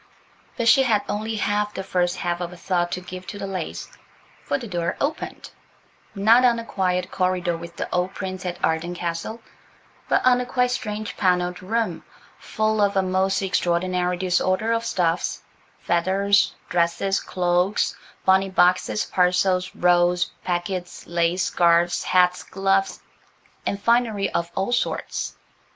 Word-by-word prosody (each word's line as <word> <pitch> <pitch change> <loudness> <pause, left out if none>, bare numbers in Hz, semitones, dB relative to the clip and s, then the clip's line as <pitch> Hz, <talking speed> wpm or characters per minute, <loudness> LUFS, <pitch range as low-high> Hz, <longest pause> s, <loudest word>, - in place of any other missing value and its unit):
But 235 -2 0
she 230 +4 +7
had 225 -6 +2
only 220 +2 -2
half 210 0 -1
the 190 - -4
first 180 -2 0
half 175 0 -2
of 175 0 -4
a 180 - -11
thought 175 -1 -1
to 180 - -3
give 185 0 -9
to 205 - -6
the 200 - -5
lace–for 190 +7 -6
the 255 - -8
door 170 -3 -2
opened, 290 +3 -4 0.6
not 225 +5 +5
on 245 -2 +5
the 230 - -5
quiet 185 -4 -1
corridor 180 -2 0
with 170 +1 -9
the - - -3
old 180 +2 0
prints 185 -1 -5
at 180 -1 -4
Arden 160 +2 -1
Castle, 175 +6 -4 0.7
but - - +2
on 250 -1 +5
a - - -3
quite 250 0 +1
strange 215 -3 -4
panelled 180 -1 +1
room, 215 -1 -2 0.4
full 215 0 0
of 200 -1 +2
a 190 - +3
most 190 +1 +1
extraordinary 180 -1 0
disorder 185 +4 +1
of 230 0 +1
stuffs–feathers, 185 +2 0
dresses, 175 +3 +1
cloaks, 180 +2 0 0.3
bonnet 190 0 +3
boxes, 180 - +3
parcels, 180 0 +1
rolls, 175 +1 +3
packets, 180 0 -3
lace, 170 +1 0
scarves, 170 0 +2
hats, 180 0 +3
gloves, 195 0 0 0.7
and 200 - -1
finery 230 -2 +1
of 170 0 -1
all 195 +5 -1
sorts. 245 - -2
185 Hz, 145 wpm, -23 LUFS, 175-205 Hz, 0.7 s, she